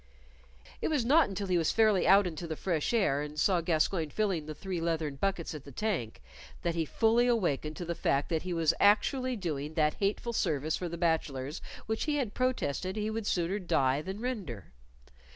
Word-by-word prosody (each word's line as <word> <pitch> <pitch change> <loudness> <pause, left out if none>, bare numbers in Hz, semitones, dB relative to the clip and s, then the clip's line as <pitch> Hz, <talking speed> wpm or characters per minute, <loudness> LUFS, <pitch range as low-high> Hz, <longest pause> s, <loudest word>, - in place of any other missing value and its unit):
It - - 0
was 290 -7 +1
not 290 +1 +5
until 200 +1 -3
he 180 -2 +2
was 165 - +2
fairly 215 -4 +3
out 200 +1 +6
into 170 -1 -4
the 160 - -3
fresh 165 -2 -1
air 195 -12 +2
and 150 +1 -5
saw 180 -1 +3
Gascoyne 165 0 +1
filling 185 -5 -1
the 155 - -6
three 180 +1 -4
leathern 160 -4 -1
buckets 190 -1 -1
at 150 -3 -8
the 140 - -11
tank, 165 - -3 0.4
that 170 - 0
he 165 -1 -1
fully 230 - +3
awakened 155 - 0
to 175 - -5
the 170 - -2
fact 140 -3 0
that 160 -2 0
he 185 - -5
was 165 -2 +2
actually 255 +5 +3
doing 155 -6 -4
that 150 -1 +3
hateful 210 +4 -1
service 155 -6 0
for 180 - -4
the 170 - -5
bachelors 150 -5 -1 0.2
which 220 0 -2
he 300 -2 0
had 250 -8 -1
protested 190 - -1
he 215 0 -2
would 220 -1 -3
sooner 180 +3 0
die 135 -6 +1
than 190 +5 -6
render. 195 - -5
175 Hz, 200 wpm, -30 LUFS, 155-210 Hz, 0.4 s, out